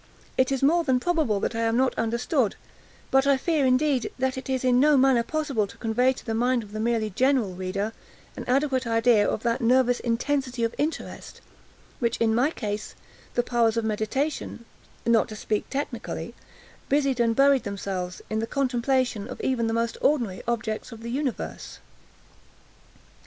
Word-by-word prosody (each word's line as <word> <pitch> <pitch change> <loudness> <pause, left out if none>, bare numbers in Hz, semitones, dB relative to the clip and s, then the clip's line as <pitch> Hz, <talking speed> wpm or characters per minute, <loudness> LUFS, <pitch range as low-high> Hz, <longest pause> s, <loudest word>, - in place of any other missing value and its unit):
It 260 +1 +2
is 270 -1 -1
more 335 +5 +4
than 260 -4 +2
probable 305 - +1
that - - -1
I 225 - -3
am 230 0 +1
not 260 0 +2
understood; 235 +1 0 0.6
but 270 +1 +4
I 280 -1 +5
fear, 295 -1 +1
indeed, 260 0 +2
that 260 0 0
it 260 +1 -7
is 260 -1 -1
in 250 -1 +4
no 295 +1 +5
manner 260 -2 +4
possible 275 -5 -1
to 230 - -14
convey 240 +3 +2
to - - -12
the 225 - -2
mind 245 +1 +1
of 205 - -13
the 215 - -5
merely 225 -1 0
general 255 -3 +2
reader, 190 +4 -3 0.4
an - - -6
adequate 260 -1 +1
idea 230 -2 +3
of 215 - -3
that 235 +2 0
nervous 245 +1 +3
intensity 250 +1 -1
of 230 - 0
interest 310 +3 -4 0.6
with 235 -2 +1
which, - - -2
in 225 -1 +2
my 250 +6 +3
case, 210 -8 -5 0.4
the 245 - +2
powers 235 -2 +1
of 230 - 0
meditation 235 +4 -2 0.4
(not 235 -2 +3
to 215 - -7
speak 210 0 -2
technically) 280 +2 -4 0.6
busied 275 -2 +2
and 230 -1 +2
buried 275 0 +5
themselves, 190 -3 -4
in 220 - -2
the 225 - -2
contemplation 255 -4 0
of - - -8
even 240 -3 0
the - - 0
most 230 0 -1
ordinary 235 -11 +1
objects 220 -1 -2
of 225 -1 -10
the 235 - -5
universe. 270 -1 -4
245 Hz, 180 wpm, -25 LUFS, 225-265 Hz, 0.6 s, I